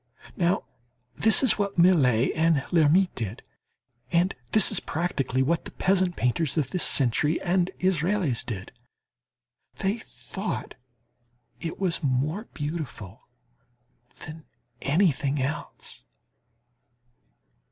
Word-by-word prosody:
Now, 175 +2 +1 0.5
this 220 +4 +5
is 245 -5 +3
what 200 -2 -2
Millet 140 -9 +4
and 160 -3 +2
Lhermitte 175 +2 +4
did, 110 -2 -5 0.7
and 175 +3 +2 0.2
this 215 -3 +7
is - - +1
practically 135 -6 -1
what 165 +4 0
the - - -6
peasant 185 -2 +1
painters 135 +5 0
of 145 -4 0
this 180 - -2
century 145 +5 +2
and 180 0 +1
Israels 180 - 0
did. 100 -5 -6 1.1
They 200 +4 -1
thought 205 -2 -6 0.9
it 165 +3 -5
was 180 -4 -1
more 150 - -1
beautiful 145 - -6 1.0
than 160 0 -10 0.4
anything 145 -3 +1
else. 135 - -4
165 Hz, 105 wpm, -26 LUFS, 135-185 Hz, 1.1 s, this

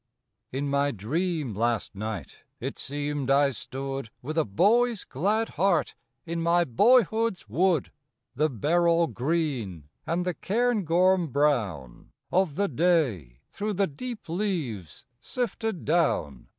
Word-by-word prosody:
In 140 +2 -2
my 140 0 +2
dream 150 - -2
last 115 +2 -1
night 105 -1 -6 0.2
it - - -5
seemed 145 -1 -3
I 140 0 +4
stood 135 0 -5
With 155 +5 -4
a 160 - +2
boy's 220 - +2
glad 210 - 0
heart 170 -3 +1 0.3
in 165 0 -3
my 170 +1 +3
boyhood's 220 - +3
wood. 165 - +1 0.4
The 150 +4 +1
beryl 170 - +2
green 125 - -2 0.2
and 175 +2 0
the 180 - 0
cairngorm 190 -5 +2
brown 110 - -1 0.2
Of 180 -5 +2
the 200 +3 +1
day 125 - +1
through 210 +1 -3
the 200 +1 +2
deep 230 - -7
leaves 160 - -3 0.2
sifted 225 - -3
down. 145 - 0
155 Hz, 125 wpm, -27 LUFS, 125-185 Hz, 0.4 s, I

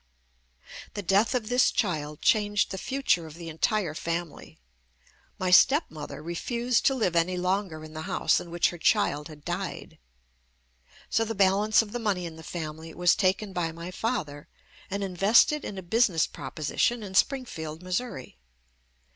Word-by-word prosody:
The 205 - -4
death 200 +7 +2
of 230 -4 -1
this 245 +2 +4
child 150 -7 -2
changed 205 -2 +2
the 190 - -4
future 260 -11 0
of 155 - -11
the 170 -1 -8
entire 170 +2 0
family. 170 0 -5 0.8
My 185 -1 -1
step 285 - +5
mother 150 -1 -8
refused 235 +9 0
to 270 - +3
live 200 -9 0
any 175 +2 +2
longer 180 -3 -1
in 155 0 -11
the 155 - -6
house 160 - +2
in 175 - -9
which 175 0 +1
her 175 - -10
child 150 -1 +2
had 150 -2 -14
died. 175 +1 -5 1.1
So 225 - +3
the 225 0 -4
balance 200 +3 +4
of 210 - -11
the 240 - -3
money 200 -6 -1
in 165 -1 -7
the 160 - -11
family 160 0 -6
was 175 0 +4
taken 195 +1 0
by 170 -3 -1
my 170 +2 -8
father 170 -9 -3 0.4
and 200 +1 -2
in 190 -2 -4
vested 230 - +4
in 200 - -6
a 190 - -6
business 180 -3 +2
proposition 215 - -2
in 195 -2 -8
Springfield, 180 - -1
Missouri. 180 - -4
185 Hz, 165 wpm, -27 LUFS, 165-215 Hz, 1.1 s, step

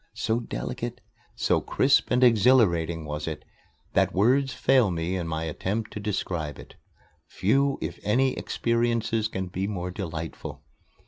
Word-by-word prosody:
So 115 0 0
delicate, 120 +1 -5 0.4
so - - +1
crisp - - +2
and 125 - +3
exhilarating 100 -9 +4
was 75 +1 -4
it 75 -1 -5 0.5
that - - +2
words 130 +7 +3
fail 130 -6 +3
me 85 +1 -2
in 85 -3 -3
my 80 0 -2
attempt 95 +8 -3
to - - -5
describe 90 -7 -3
it. - - -12 0.5
Few, 135 +7 +1
if - - -4
any, 130 +5 +2
experiences 115 -1 0
can 95 -4 -4
be 95 +2 -3
more 90 -3 -3
delightful. 80 -5 -6
105 Hz, 140 wpm, -26 LUFS, 85-120 Hz, 0.5 s, exhilarating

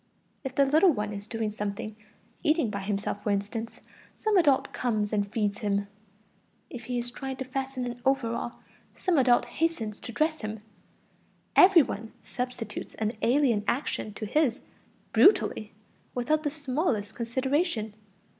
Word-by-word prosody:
If 265 -2 -5
the 280 - +5
little 315 +7 +5
one 210 -5 -2
is 200 +1 -7
doing 225 -2 -2
something, 210 0 -4 0.5
eating 305 -7 +2
by 200 - -3
himself, 200 0 -2
for 210 - -2
instance, 210 +3 -2 0.4
some 435 -2 +1
adult 290 -8 +4
comes 215 -4 -1
and 200 -1 0
feeds 210 -2 0
him; 200 -1 0 0.9
if 235 -2 -7
he 245 +1 -2
is 240 0 -1
trying 265 +1 -5
to 265 - -5
fasten 265 -1 -3
an 245 0 -6
overall, 240 -3 0 0.4
some 355 -6 +2
adult 245 -2 +4
hastens 245 -11 -2
to - - -7
dress 310 +5 0
him; 215 -1 -5 0.9
every 365 -4 +8
one 225 -3 -6
substitutes 250 -2 -5
an 220 +1 -1
alien 240 -4 +3
action 245 -4 -1
to 215 - -4
his, 265 +1 +2 0.5
brutally, 380 - +4 0.4
without 300 +5 +1
the 300 - 0
smallest 270 - -1
consideration. 255 - -1
240 Hz, 145 wpm, -28 LUFS, 215-280 Hz, 0.9 s, every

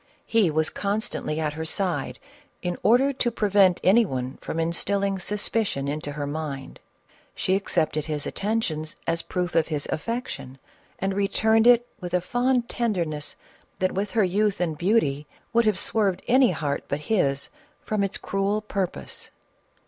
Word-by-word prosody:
Ho 225 -4 +5
was 155 +1 +1
constantly 205 -6 -2
at 155 -2 -1
her 160 +1 -4
side, 160 -3 -1 0.5
in 175 -1 -1
order 260 +5 +4
to 250 -2 +1
prevent 200 -5 +3
any 220 +6 +6
one 130 - -3
from 165 - -4
instilling 195 +4 0
suspicion 205 -5 -1
into 145 0 -3
her 145 0 -3
mind. 145 -2 -5 0.6
She 185 - 0
accepted 160 -6 0
his 150 -2 -3
attentions 185 -8 -2
as 165 0 0
proof 180 -1 -2
of 160 -1 +3
his 150 -3 -2
affection, 230 - -4 0.4
and 195 +1 -1
returned 220 +3 +3
it 240 0 +6
with 180 -2 -3
a - - +4
fond 245 +4 +1
tenderness 170 -13 -2 0.4
that, 185 0 +1
with 195 +2 -2
her 215 - +6
youth 200 +2 +1
and 170 -3 0
beauty, 150 -5 +1 0.3
would 235 0 +4
have 215 -4 +3
swerved 195 0 0
any 255 0 +5
heart 150 -4 -2
but 145 +1 -2
his 140 -7 +1 0.4
from 215 -2 0
its 195 -1 -2
cruel 195 +2 0
purpose. 195 -4 -3
185 Hz, 155 wpm, -25 LUFS, 155-215 Hz, 0.6 s, any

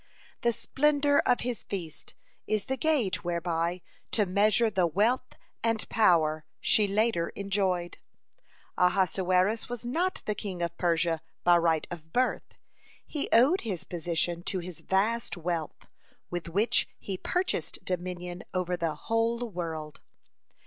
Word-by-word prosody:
The 235 - +3
splendor 285 +5 +2
of 245 - +3
his 245 -3 -3
feast 170 -6 -7 0.3
is 215 -2 0
the 265 - -1
gauge 270 -10 +1
whereby 170 0 -1 0.3
to 210 - +2
measure 210 +4 +3
the 185 -3 +2
wealth 230 +9 +1 0.3
and 225 -1 0
power 160 -7 +3 0.2
she 210 -2 +4
later 200 -4 +1
enjoyed. 190 -3 -1 0.8
(3) 180 - +6
Ahasuerus 185 +3 +1
was 245 -1 -5
not 340 +10 -1
the 210 - 0
king 190 -4 -4
of 170 0 -2
Persia 165 -2 +1 0.2
by 175 0 +6
right 165 -2 +2
of 160 -2 -8
birth. 255 +5 0 0.5
He 295 - -3
owed 270 +11 +5
his 195 -7 -4
position 170 0 -1
to 190 - -1
his 180 -2 -6
vast 210 +2 0
wealth, 170 -2 -3 0.5
with 175 -1 -4
which 210 +7 +2
he 195 - -5
purchased 360 - -2
dominion 180 -1 -4
over 180 -1 0
the 165 -3 -1
whole 230 +6 0
world. 160 -4 -5
185 Hz, 135 wpm, -29 LUFS, 175-230 Hz, 0.8 s, 3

